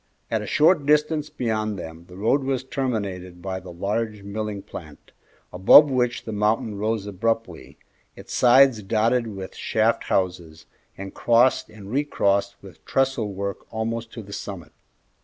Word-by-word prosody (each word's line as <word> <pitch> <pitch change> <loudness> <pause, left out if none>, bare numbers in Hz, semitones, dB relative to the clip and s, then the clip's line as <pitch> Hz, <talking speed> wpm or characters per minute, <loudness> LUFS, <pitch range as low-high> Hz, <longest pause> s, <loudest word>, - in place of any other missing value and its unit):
At - - 0
a - - -6
short 150 -2 +3
distance 150 0 +2
beyond 110 -3 -2
them 80 -1 -9
the 90 - -13
road 115 +7 +1
was 130 -1 -1
terminated 100 -10 -3
by 95 +1 -4
the 90 -1 -11
large 105 +4 -3
milling 100 0 -5
plant, 75 -4 -11 0.4
above 115 +11 +7
which 125 -2 0
the 110 - -5
mountain 105 0 0
rose 110 -1 -1
abruptly, 105 -3 -3 0.4
its - - -10
sides 125 -2 +5
dotted 115 +4 +1
with 95 -3 -7
shaft 110 +1 0
houses 85 -4 -2 0.3
and 95 0 -7
crossed 120 +1 +3
and 105 -2 -11
recrossed 100 -8 +1
with 95 -6 -14
trestle 130 -6 0
work 100 0 -5
almost 115 0 -3
to 115 - -7
the 100 0 -11
summit. 95 -6 -7
110 Hz, 150 wpm, -24 LUFS, 95-120 Hz, 0.4 s, above